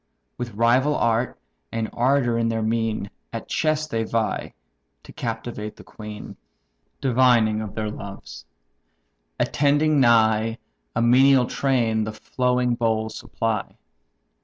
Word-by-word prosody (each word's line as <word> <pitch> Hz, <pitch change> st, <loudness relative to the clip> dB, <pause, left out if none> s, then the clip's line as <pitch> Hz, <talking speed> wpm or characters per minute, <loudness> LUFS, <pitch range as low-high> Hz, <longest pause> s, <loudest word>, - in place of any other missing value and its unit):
With 120 Hz, -4 st, -6 dB
rival 125 Hz, +6 st, +3 dB
art, 115 Hz, +1 st, 0 dB, 0.3 s
and 115 Hz, -1 st, -2 dB
ardour 125 Hz, -1 st, +2 dB
in 115 Hz, 0 st, +1 dB
their 115 Hz, -1 st, -1 dB
mien, 110 Hz, -2 st, -1 dB, 0.2 s
At 115 Hz, -1 st, -6 dB
chess 155 Hz, -1 st, 0 dB
they 115 Hz, -7 st, -2 dB
vie, 110 Hz, 0 st, -2 dB, 0.5 s
to -, -, -13 dB
captivate 105 Hz, 0 st, -5 dB
the -, -, -14 dB
queen; 105 Hz, -1 st, -9 dB, 0.6 s
Divining 120 Hz, -5 st, +3 dB
of 105 Hz, -2 st, -7 dB
their 110 Hz, -1 st, -2 dB
loves. 100 Hz, -, -9 dB, 0.9 s
Attending 145 Hz, +1 st, +2 dB
nigh, 115 Hz, -2 st, +3 dB, 0.4 s
A -, -, +1 dB
menial 130 Hz, +2 st, +5 dB
train 120 Hz, -5 st, +1 dB
the 110 Hz, 0 st, -4 dB
flowing 125 Hz, +2 st, 0 dB
bowl 110 Hz, -2 st, 0 dB
supply. 110 Hz, -2 st, -3 dB
115 Hz, 120 wpm, -23 LUFS, 110-125 Hz, 0.9 s, menial